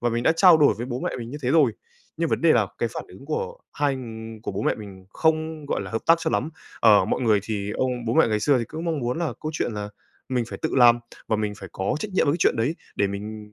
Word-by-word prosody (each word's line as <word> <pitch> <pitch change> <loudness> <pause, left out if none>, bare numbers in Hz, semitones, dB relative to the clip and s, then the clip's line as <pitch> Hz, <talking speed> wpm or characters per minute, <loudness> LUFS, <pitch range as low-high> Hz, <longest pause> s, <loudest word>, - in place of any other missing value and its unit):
Và 120 - +1
mình 120 +1 -1
đã 160 - +4
trao 180 -2 +8
đổi 150 -2 +4
với 120 - -5
bố 125 0 -4
mẹ - - -2
mình 115 0 -6
như 145 - -6
thế 125 - 0
rồi, 155 -1 +4 0.4
nhưng - - 0
vấn - - 0
đề - - +5
là - - +3
cái - - 0
phản - - -5
ứng - - -13
của 475 +1 -3
hai 145 -2 0
ng 110 -3 -8
của - - -4
bố 100 +3 -3
mẹ - - +2
mình 100 -3 -11
không, 160 +2 0
gọi - - -1
là, - - -7
hợp 115 - -3
tác 165 - +7
cho 160 -1 -1
lắm. 150 - -1 0.3
Ờ, 105 -4 +6
mọi - - -1
người 110 -5 +3
thì 105 -1 -3
ông 125 +1 -2
bố 115 - 0
mẹ - - +5
ngày 105 -1 0
xưa 140 +2 +3
thì 120 - -1
cũng 160 +7 -7
mong 165 -3 -1
muốn 125 +5 -2
là 170 -3 -1
câu 155 +1 -4
chuyện 120 - -1
là 105 -1 -4 0.4
mình 125 -2 0
phải - - -7
tự 160 - 0
làm 120 -2 +7 0.3
và 110 - +2
mình 105 -1 -2
phải 95 - -9
có 95 - -1
trách 215 - -4
nhiệm 185 - +2
với 140 - +3
cái 165 - -2
chuyện - - +3
đấy 125 +9 0 0.2
để 100 - +2
mình, 105 +1 -7
120 Hz, 295 wpm, -24 LUFS, 110-155 Hz, 0.4 s, trao